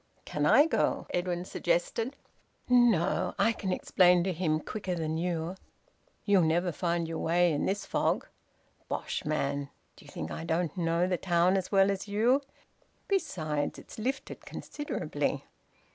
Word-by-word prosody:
"Can 150 0 0
I 290 - +7
go?" 325 - 0
Edwin 175 0 -1
suggested. 185 +10 -1 0.5
"No. 235 -8 +3
I 230 - +4
can 195 -4 -3
explain 180 -1 +4
to 190 0 -1
him 160 -2 0
quicker 190 +1 -4
than 160 -2 -2
you." 170 0 -2 0.7
"You'll 200 -3 +5
never 170 +2 +2
find 170 0 -1
your 165 -1 -4
way 175 0 +3
in 145 - 0
this 200 +1 -1
fog." - - 0 0.6
"Bosh, - - -3
man! 140 -2 -1 0.3
D'you - - -16
think 80 - -6
I - - -5
don't 165 -1 -1
know 170 -1 +1
the 180 -1 0
town 175 +1 +2
as 190 -2 -2
well 195 0 +5
as 195 +1 -4
you? 230 +7 +3 0.7
Besides, 155 - -1
it's - - -11
lifted 265 +5 -3
considerably." 295 0 -3
175 Hz, 145 wpm, -30 LUFS, 165-200 Hz, 0.7 s, I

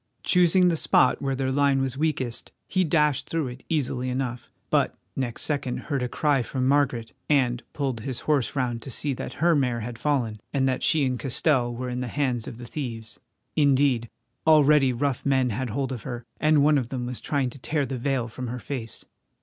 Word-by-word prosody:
Choosing 180 0 +4
the 170 - +1
spot 130 -4 +3
where 135 -1 -1
their 130 0 -1
line 140 0 +3
was 135 -1 -1
weakest 135 -5 -2 0.2
he 185 -1 +1
dashed 150 -4 +1
through 160 -5 -1
it 125 +1 -10
easily 130 -5 -1
enough 125 -1 -3 0.2
but - - +2 0.2
next 125 -3 -2
second 140 -4 -1
heard 140 -4 -3
a 125 - -1
cry 145 0 +2
from 130 +1 -2
Margaret, 130 -5 +1 0.2
and 130 -4 +2
pulled 135 -5 -2
his 125 +3 -4
horse 145 -6 +1
round 120 -3 -1
to 135 - -7
see 140 +3 -1
that - - -6
her 170 +2 +3
mare 125 -5 +1
had 115 0 -6
fallen, 120 -7 0
and 135 -2 +1
that 130 - 0
she 155 -3 +3
and 125 -2 -1
Castell 130 -2 +1
were 125 +1 -4
in 125 0 -3
the 125 - -3
hands 125 -3 -1
of 115 - -7
the 120 - -9
thieves. 115 -5 -6 0.4
Indeed, 135 -5 +3 0.4
already 150 -3 +6
rough 130 +1 -1
men 130 -3 +2
had 125 +4 -2
hold 135 +4 -2
of 125 -4 -4
her, 120 -1 -6
and 155 -1 +4
one 150 -1 +5
of 120 -3 -4
them 125 -2 -3
was 125 0 -6
trying 135 -4 -1
to 140 - -12
tear 145 +2 -1
the 130 -2 -4
veil 130 -2 0
from 125 +2 -6
her 120 +2 -4
face. 120 -3 -6
130 Hz, 205 wpm, -25 LUFS, 125-145 Hz, 0.4 s, already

